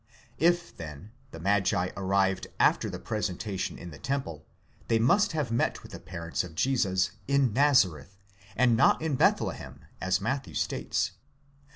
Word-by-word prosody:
If, 175 +3 +2
then, 80 +5 -9 0.2
the 80 - -10
magi 95 -1 +1
arrived 95 -1 +1
after - - +3
the - - -5
presentation 100 -2 -3
in 85 - -9
the 70 - -11
temple, 130 - -3 0.4
they 115 - +3
must 185 - +3
have 150 -7 -1
met 115 - 0
with - - -12
the - - -8
parents 85 -1 -4
of 85 -3 -10
Jesus 95 -4 +1 0.2
in 140 -4 +2
Nazareth, 100 - +2 0.4
and 120 -1 +4
not 115 - +4
in 160 -2 -2
Bethlehem, 130 - 0 0.2
as 95 +1 +1
Matthew 135 +7 -3
states. - - -1
100 Hz, 150 wpm, -28 LUFS, 90-135 Hz, 0.4 s, and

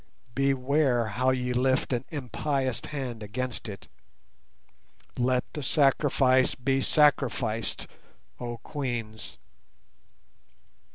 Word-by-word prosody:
Beware 135 -2 +2
how 125 +5 +1
ye 125 -1 0
lift 130 +1 +1
an 120 +1 -1
impious 135 -3 -2
hand 130 -6 -5
against 115 +3 -4
it! 100 -2 -9 1.3
Let 125 0 +1
the 150 - -4
sacrifice 135 -2 +3
be 135 +1 0
sacrificed, 120 -7 +2 0.5
oh 120 -1 -4
Queens." 115 - -5
130 Hz, 90 wpm, -28 LUFS, 120-135 Hz, 1.3 s, sacrifice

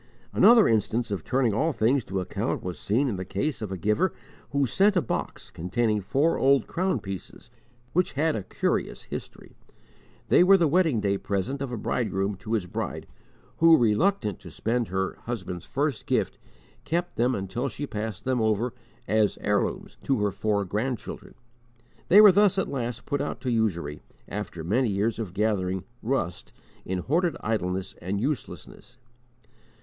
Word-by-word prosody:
Another 230 -2 +7
instance 115 +1 +1
of 100 - -3
turning 125 -4 +1
all 155 +10 +1
things 125 0 +2
to 95 0 -2
account 90 - -2
was 90 -1 -5
seen 125 +8 +1
in 105 -7 -2
the 95 - -3
case 110 - -2
of 105 -3 -4
a 95 - -3
giver 105 - +1 0.4
who 140 -1 +1
sent 200 - +3
a - - +6
box 130 - -4
containing 105 +5 0
four 140 - +1
old 135 0 +4
crown 185 -5 -1
pieces 95 -3 -8 0.4
which 180 +2 +1
had 155 +3 +1
a 105 - -2
curious 95 - -2
history. - - -8 0.7
They - - +6
were 195 +2 +7
the 170 -3 +3
wedding 160 - +2
day 100 -1 0
present 100 +8 -2
of 135 -3 -3
a 120 - -3
bridegroom 105 -3 -1
to 110 +4 -5
his 105 -5 +1
bride, 90 - -4 0.5
who, 165 0 +7
reluctant 115 - +1
to - - -11
spend 120 0 -1
her 95 +1 -2
husband's 90 -7 -5
first 140 -2 -2
gift, - - 0 0.4
kept 175 +2 -2
them 125 +2 +2
until 100 +8 -3
she 140 +6 -5
passed 110 -5 -5
them 130 -2 +1
over, 110 +2 +1 0.3
as 105 0 +2
heirlooms, 105 -1 -1
to 135 - +2
her 105 -1 +1
four 100 0 0
grand 115 +7 -1
children. - - -10 0.7
They 205 +4 +8
were 210 -2 +10
thus 200 0 +4
at 190 - +1
last 125 -2 -4
put 145 -1 -1
out 145 - -3
to 125 - -1
usury, 85 -10 -1 0.3
after 100 -5 -5
many 115 +8 +1
years 105 +3 0
of 100 -5 -5
gathering 95 -3 0 0.2
"rust" 110 -9 -2 0.3
in 95 - -2
hoarded 160 - 0
idleness 95 -3 -2
and 95 +3 -2
uselessness. 125 -1 -5
115 Hz, 170 wpm, -26 LUFS, 100-140 Hz, 0.7 s, were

